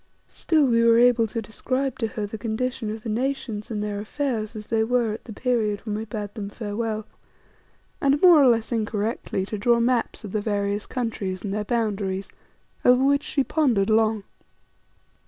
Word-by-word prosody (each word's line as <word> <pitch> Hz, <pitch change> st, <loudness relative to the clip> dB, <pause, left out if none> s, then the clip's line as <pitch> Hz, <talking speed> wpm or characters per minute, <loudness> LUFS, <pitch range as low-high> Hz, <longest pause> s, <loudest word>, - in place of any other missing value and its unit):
Still 310 Hz, -3 st, +1 dB
we 230 Hz, -2 st, +3 dB
were 230 Hz, 0 st, +6 dB
able 240 Hz, -1 st, +5 dB
to 225 Hz, +1 st, -4 dB
describe 255 Hz, +6 st, -2 dB
to 225 Hz, -, 0 dB
her 220 Hz, -2 st, -4 dB
the 210 Hz, +1 st, -7 dB
condition 230 Hz, +1 st, -2 dB
of 215 Hz, 0 st, -6 dB
the -, -, -6 dB
nations 235 Hz, -2 st, -2 dB
and 210 Hz, -2 st, -3 dB
their 205 Hz, -1 st, -3 dB
affairs 225 Hz, -1 st, -3 dB
as 210 Hz, -1 st, -7 dB
they 225 Hz, 0 st, +1 dB
were 235 Hz, -1 st, +1 dB
at 220 Hz, -, -9 dB
the -, -, -9 dB
period 220 Hz, -3 st, 0 dB
when 210 Hz, -, -3 dB
we 220 Hz, +1 st, -4 dB
bade 210 Hz, -2 st, -5 dB
them 205 Hz, -3 st, -5 dB
farewell, 215 Hz, 0 st, -3 dB, 1.0 s
and, 280 Hz, +1 st, +3 dB
more 345 Hz, -4 st, +7 dB
or 270 Hz, -, +6 dB
less 230 Hz, -1 st, +2 dB
incorrectly, 215 Hz, -3 st, -2 dB
to 210 Hz, +1 st, -5 dB
draw 235 Hz, +3 st, +3 dB
maps 235 Hz, 0 st, 0 dB
of 205 Hz, -, -7 dB
the 215 Hz, -, -1 dB
various 205 Hz, -1 st, -1 dB
countries 210 Hz, -7 st, -3 dB
and 200 Hz, -2 st, -3 dB
their 210 Hz, 0 st, -1 dB
boundaries, 200 Hz, -4 st, -1 dB, 0.5 s
over 250 Hz, +1 st, +5 dB
which 280 Hz, +1 st, +3 dB
she 280 Hz, -1 st, 0 dB
pondered 245 Hz, -10 st, +1 dB
long. 220 Hz, -1 st, +2 dB
225 Hz, 185 wpm, -24 LUFS, 210-245 Hz, 1.0 s, more